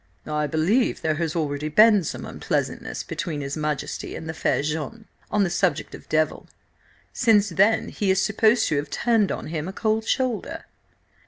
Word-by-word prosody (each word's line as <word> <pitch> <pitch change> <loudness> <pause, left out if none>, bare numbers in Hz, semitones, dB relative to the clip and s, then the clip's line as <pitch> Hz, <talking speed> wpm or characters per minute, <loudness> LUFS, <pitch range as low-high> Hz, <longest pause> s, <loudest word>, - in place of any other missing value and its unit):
"I 150 0 -1
believe 170 - +1
there 155 - +2
has 160 -1 -1
already 150 -2 -2
been 210 +3 +6
some - - -5
unpleasantness - - -3
between 165 -4 -4
his 140 0 -4
Majesty 150 -3 -3
and 160 - -7
the 160 - -3
fair 155 - 0
Jeanne 160 +9 -4 0.2
on 210 -1 +2
the 190 - +1
subject 180 +1 0
of - - -11
Devil. 155 0 0 0.7
Since 215 -4 +3
then 200 +6 +2
she 205 - -1
is 190 0 +3
supposed 215 +3 +3
to 150 - +1
have 145 - -2
turned 225 -4 +2
on - - -4
him 160 0 -3
a 190 - -5
cold 220 +1 0
shoulder." 255 -4 -1
175 Hz, 175 wpm, -24 LUFS, 155-215 Hz, 0.7 s, been